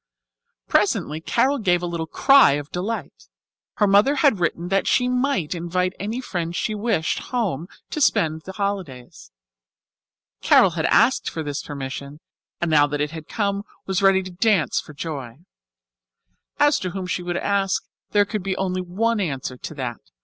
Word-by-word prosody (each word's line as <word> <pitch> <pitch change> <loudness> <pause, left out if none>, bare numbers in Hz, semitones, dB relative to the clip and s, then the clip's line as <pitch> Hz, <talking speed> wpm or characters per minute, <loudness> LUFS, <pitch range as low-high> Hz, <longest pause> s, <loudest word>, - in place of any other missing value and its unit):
Presently 155 +2 +1
Carol 275 - +1
gave 180 -5 +1
a - - 0
little 170 -2 -3
cry 275 - +6
of 145 0 -4
delight. 180 - -5 0.5
Her 210 - +3
mother 205 +8 +4
had 270 - +3
written 175 0 -1
that 195 0 +1
she 250 - +3
might 250 - 0
invite 180 +2 -1
any 215 +5 -3
friend 175 -8 -4
she 215 - -1
wished 210 -6 0
home 215 - -1
with 175 - -11
her - - -20 0.2
to 305 - -3
spend 160 - +2
the 190 +4 -9
holidays. 190 - -5 1.1
Carol - - +5
had - - -2
asked - - +3
for 160 - -5
this 145 -2 -3
permission, 140 +1 -7 0.4
and 170 -1 -1
now 145 -1 +5
that 145 0 -3
it 150 0 -1
had 160 -1 -8
come 200 -2 -1 0.2
was 190 0 -1
ready 195 -1 +4
to 185 - -8
dance 190 -2 +2
for 155 - -13
joy. 140 -7 -6 1.2
As 290 +1 +4
to 185 - -3
whom 185 +1 -5
she 180 0 -2
would 175 0 -3
ask, 195 -1 0 0.2
there 205 -1 +3
could 210 0 -3
be 190 0 -2
only 185 -1 -1
one 215 +6 0
answer 135 -8 -3
to 155 - -8
that. 125 -4 -4
180 Hz, 175 wpm, -23 LUFS, 155-205 Hz, 1.2 s, cry